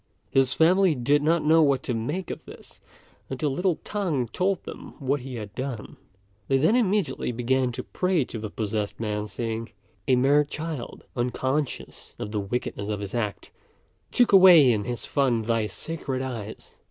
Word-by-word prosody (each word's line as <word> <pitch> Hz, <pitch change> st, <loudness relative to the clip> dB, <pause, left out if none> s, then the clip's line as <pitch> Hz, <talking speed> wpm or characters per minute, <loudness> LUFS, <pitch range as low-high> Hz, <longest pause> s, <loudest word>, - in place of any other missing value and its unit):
His 135 Hz, -1 st, +3 dB
family 180 Hz, +2 st, +4 dB
did 140 Hz, +4 st, +2 dB
not 160 Hz, +1 st, +2 dB
know 160 Hz, +1 st, +6 dB
what 140 Hz, -3 st, +2 dB
to 125 Hz, -, -2 dB
make 145 Hz, +11 st, -3 dB
of -, -, -7 dB
this, -, -, -13 dB, 0.5 s
until 135 Hz, +2 st, -1 dB
little 180 Hz, +5 st, +1 dB
T'ang 165 Hz, -, -1 dB
told 190 Hz, 0 st, 0 dB
them -, -, -9 dB
what 140 Hz, +1 st, -1 dB
he 130 Hz, 0 st, -7 dB
had 105 Hz, -3 st, -7 dB
done; 130 Hz, -2 st, -5 dB, 0.5 s
they 135 Hz, -, +3 dB
then 160 Hz, -, +3 dB
immediately 210 Hz, -, +1 dB
began 125 Hz, +2 st, 0 dB
to 125 Hz, +1 st, -5 dB
pray 180 Hz, -6 st, 0 dB
to 115 Hz, -, -7 dB
the 110 Hz, 0 st, -5 dB
possessed 105 Hz, -1 st, -3 dB
man, 105 Hz, -1 st, -2 dB
saying, 115 Hz, +1 st, -4 dB, 0.3 s
"A 130 Hz, -, +5 dB
mere 140 Hz, +4 st, +4 dB
child, 150 Hz, -2 st, -6 dB
unconscious 130 Hz, +3 st, -3 dB
of 105 Hz, -, -5 dB
the 105 Hz, -, -1 dB
wickedness 100 Hz, 0 st, -3 dB
of 105 Hz, -1 st, -2 dB
his 100 Hz, -1 st, -6 dB
act, 105 Hz, -5 st, -3 dB, 0.6 s
took 245 Hz, -, +3 dB
away 180 Hz, -9 st, +8 dB
in 105 Hz, -3 st, -1 dB
his 120 Hz, -1 st, -4 dB
fun 125 Hz, -6 st, +1 dB
thy 115 Hz, -1 st, 0 dB
sacred 135 Hz, -2 st, -4 dB
eyes. 115 Hz, -5 st, -7 dB
130 Hz, 170 wpm, -25 LUFS, 115-155 Hz, 0.6 s, away